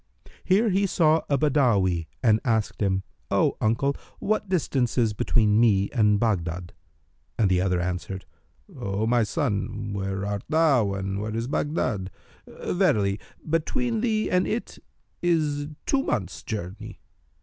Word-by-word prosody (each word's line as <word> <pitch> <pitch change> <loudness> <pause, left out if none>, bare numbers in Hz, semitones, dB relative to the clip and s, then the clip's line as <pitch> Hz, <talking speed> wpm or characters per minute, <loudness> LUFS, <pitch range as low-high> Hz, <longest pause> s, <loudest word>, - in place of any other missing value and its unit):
Here 210 +5 +3
he 195 +2 +2
saw 160 -3 +3
a 140 - +3
Badawi 115 - +2 0.2
and 110 -3 +4
asked 110 -5 0
him, 95 -1 +1 0.3
"O - - +2
uncle, 115 +6 +1 0.2
what 210 -1 -1
distance 140 -10 0
is 115 -3 +2
between 105 0 +2
me 100 -4 +3
and 105 -4 +3
Baghdad?"; 90 -6 -1 0.6
and 100 -4 +2
the 90 -1 +3
other 90 -1 +1
answered, 90 +2 -4 0.5
"O 100 +2 -2
my 120 +1 +3
son, 105 -4 -2
where 95 0 -3
art 100 0 -2
thou, 140 -11 +3
and 95 0 -3
where 110 +1 -4
is 115 +1 -1
Baghdad?[FN#301] 125 - -4
Verily, 110 - +2 0.3
between 225 - 0
thee 220 -2 +1
and 180 0 +2
it 230 - -4 0.4
is 150 -4 +1 0.2
two 275 - +2
months' 95 - -2
journey." 105 +1 -6
110 Hz, 140 wpm, -25 LUFS, 100-155 Hz, 0.6 s, and